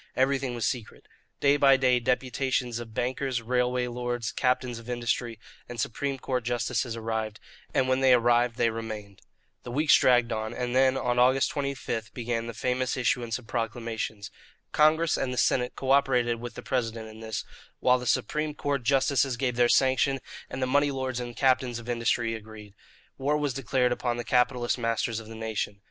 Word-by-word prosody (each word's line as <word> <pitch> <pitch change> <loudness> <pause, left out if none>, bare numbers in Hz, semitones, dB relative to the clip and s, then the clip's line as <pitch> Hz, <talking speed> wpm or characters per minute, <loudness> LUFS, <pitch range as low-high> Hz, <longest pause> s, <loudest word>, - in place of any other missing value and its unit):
Everything 135 -1 +1
was 115 -3 -1
secret. 115 0 -4 0.3
Day 140 0 +4
by 135 -2 +6
day 125 -2 +3
deputations 125 0 -1
of 115 -1 -8
bankers, 130 -1 -1
railway 125 +1 +1
lords, 120 -1 -3
captains 125 -2 0
of 115 +1 -12
industry, 120 -1 -2 0.3
and 120 -1 -7
Supreme 135 +5 -2
Court 125 -1 -2
justices 120 0 -1
arrived; 110 -1 -3 0.3
and 130 - +1
when 130 0 +2
they 135 -1 +5
arrived 120 0 +3
they 115 - +2
remained. 110 -3 -7 0.4
The - - -9
weeks 145 +3 +4
dragged 120 -2 +4
on, 110 +1 -3
and 125 0 -2
then, 130 0 +4
on 125 -1 0
August 130 +2 +4
25, 135 -6 -3
began 115 -1 -2
the 115 - -6
famous 125 +3 -1
issuance 120 -2 0
of 125 - -14
proclamations. 115 -2 -4 0.4
Congress 155 +2 +3
and 130 - -1
the 125 - -4
Senate 125 +1 +1
co 135 0 -2
operated 125 -4 +3
with 120 0 -7
the - - -8
President 115 -4 -2
in 110 0 -12
this, 110 0 -4 0.3
while 125 0 +4
the 125 - -6
Supreme 150 +3 0
Court 145 -2 -1
justices 135 0 +2
gave 125 -2 -1
their 120 0 +3
sanction 135 +1 +3 0.3
and 130 - -3
the - - +3
money 145 +3 +3
lords 130 -2 -3
and 120 0 -4
the 120 - -11
captains 130 -2 +2
of 120 0 -9
industry 115 -1 0
agreed. 110 -2 -10 0.5
War 145 +3 +1
was 145 -3 -1
declared 125 0 +1
upon 120 -1 -1
the 120 - -3
capitalist 125 +1 +1
masters 115 -1 -1
of 110 - -11
the 115 - -9
nation. 110 -2 -3
125 Hz, 185 wpm, -27 LUFS, 115-130 Hz, 0.5 s, by